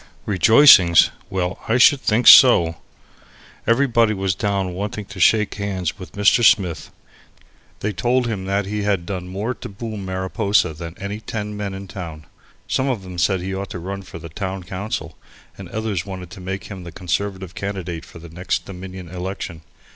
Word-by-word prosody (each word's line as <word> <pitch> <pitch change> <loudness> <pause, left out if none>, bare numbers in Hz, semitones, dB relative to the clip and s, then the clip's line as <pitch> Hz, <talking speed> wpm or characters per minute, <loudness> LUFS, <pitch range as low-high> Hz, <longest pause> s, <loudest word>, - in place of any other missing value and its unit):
Rejoicings! 105 - +6 0.2
Well, 90 -2 -2
I 115 - +2
should 135 +2 +6
think 115 0 +1
so! 85 - +8 0.9
Everybody 115 -2 +3
was 95 -1 0
down 95 0 -2
wanting 100 +2 -4
to 100 -1 -11
shake 105 +4 +3
hands 95 -4 -3
with 90 - -10
Mr. 105 +4 +3
Smith. 95 -7 +3 0.9
They 105 +1 -2
told 120 +7 +1
him 105 -5 -3
that 100 +1 -1
he 105 +2 -3
had 100 -4 0
done 90 -1 -5
more 100 +7 -3
to - - -9
boom 105 0 -6
Mariposa 95 -1 0
than 85 +2 -9
any 100 +2 -5
ten 105 -1 -5
men 100 -2 -4
in 95 0 -8
town. 85 -6 -8 0.4
Some 130 - 0
of 115 -7 -2
them 90 -2 -7
said 95 +3 +1
he 95 +1 -4
ought 95 0 -4
to - - -6
run 95 +3 -6
for 90 - -10
the 85 - -9
town 95 +3 -5
council, 90 -4 -5 0.4
and 95 -3 -10
others 105 -5 -3
wanted 90 -2 -8
to 95 -1 -10
make 95 0 -5
him 95 -3 -9
the 85 - -9
Conservative 95 +1 -3
candidate 90 -5 -5
for - - -13
the 85 0 -11
next 90 +3 -3
Dominion 95 -1 -9
election. 90 -1 -6
95 Hz, 175 wpm, -21 LUFS, 90-105 Hz, 0.9 s, so